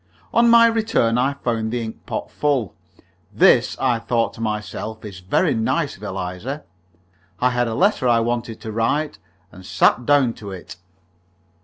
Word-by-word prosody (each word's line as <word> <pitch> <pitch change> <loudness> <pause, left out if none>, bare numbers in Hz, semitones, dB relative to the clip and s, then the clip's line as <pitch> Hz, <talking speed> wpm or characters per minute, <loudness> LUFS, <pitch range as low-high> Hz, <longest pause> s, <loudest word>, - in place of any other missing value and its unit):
On 235 0 +5
my 230 0 +7
return 220 - +1
I 135 +3 +1
found 115 -5 -2
the 120 -1 -2
ink 110 0 -9
pot - - -4
full. 140 -9 0 0.6
"This," - - +4
I 125 -3 +1
thought 115 0 -1
to - - -10
myself, 110 0 -4
"is 100 -3 -8
very 90 0 +1
nice 130 +7 -1
of 95 - -19
Eliza." 95 +8 -5 0.8
I 125 0 +2
had 120 -1 0
a 115 - -3
letter 190 -9 +2
I 120 -1 +4
wanted 115 -1 -2
to 110 -1 -6
write, 115 +8 -1 0.3
and 95 - -13
sat 90 +7 +2
down 140 -5 +4
to 100 - -7
it. 95 -2 -9
115 Hz, 165 wpm, -21 LUFS, 110-135 Hz, 0.8 s, my